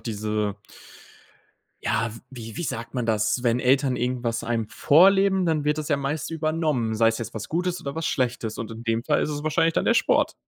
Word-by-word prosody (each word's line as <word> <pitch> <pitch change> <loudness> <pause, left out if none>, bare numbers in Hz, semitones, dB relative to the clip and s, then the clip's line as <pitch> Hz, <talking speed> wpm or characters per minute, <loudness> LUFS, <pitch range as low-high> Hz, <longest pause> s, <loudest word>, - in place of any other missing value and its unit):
diese 105 -2 -2 1.3
ja, 115 - 0
w 115 - -11
wie 115 -4 -9
wie - - -3
sagt 115 -4 -5
man 125 -2 -1
das? 110 +3 +1
Wenn 120 0 +2
Eltern 130 0 +2
irgendwas 120 -1 -2
einem 115 -2 -1
vorleben, 190 +4 +4
dann 155 -3 0
wird 150 +1 +1
das 150 - -4
ja 145 - +2
meist 140 +3 -3
übernommen. 155 -8 -1
Sei 115 +1 +4
es 115 - -1
jetzt 115 0 -6
was 110 - -6
Gutes 180 +2 -1
oder 140 +2 -6
was 165 - -2
Schlechtes. 120 -4 -1
Und 115 -1 -5
in 115 +1 -9
dem 115 0 0
Fall 150 +4 +1
ist 150 - -1
es 145 0 -4
wahrscheinlich 165 +1 +2
dann - - +1
der - - +3
Sport. - - +2
125 Hz, 210 wpm, -24 LUFS, 115-155 Hz, 1.3 s, vorleben